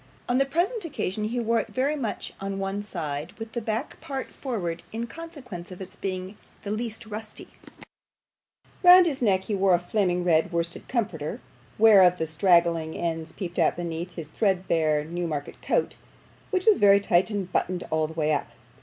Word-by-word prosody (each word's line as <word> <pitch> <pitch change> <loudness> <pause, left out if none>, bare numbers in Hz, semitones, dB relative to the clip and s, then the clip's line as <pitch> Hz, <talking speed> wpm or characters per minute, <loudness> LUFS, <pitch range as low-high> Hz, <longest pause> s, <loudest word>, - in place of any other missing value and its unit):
On 245 +1 +2
the 275 - +2
present 360 - 0
occasion 215 - -3
he 235 +3 -1
wore 230 0 +2
it - - -3
very 275 +4 0
much 245 -8 -4
on 195 0 -3
one 195 +1 -2
side, 160 -6 -5
with 225 0 -8
the 235 - -3
back 225 +5 -3
part 275 -4 -5
forward 175 -11 -4
in 230 +1 -3
consequence 255 - -9
of 185 - -10
its 190 +1 -9
being 190 +1 -5 0.2
the 205 - -4
least 225 +1 -3
rusty; 215 0 -6 1.3
round 360 0 +9
his 290 -6 -1
neck 195 -5 +3
he 210 - -4
wore 195 -2 +4
a - - 0
flaming 180 -1 0
red 165 -2 +3
worsted 170 0 -3
comforter, 180 - -2 0.4
whereof 195 -5 +7
the 160 - -1
straggling 170 -1 +2
ends 165 -1 -3
peeped 175 -1 -5
out 165 - +3
beneath 170 +1 -5
his 165 -4 -6
threadbare 165 -6 +1
Newmarket 165 -3 -4
coat, - - 0 0.6
which 370 -2 0
was 435 -3 +5
very 200 -1 +7
tight 185 -1 +2
and 200 -4 -3
buttoned 180 -1 0
all 155 0 +1
the 160 - -9
way 155 -1 +1
up. 145 - -1
195 Hz, 180 wpm, -26 LUFS, 170-230 Hz, 1.3 s, round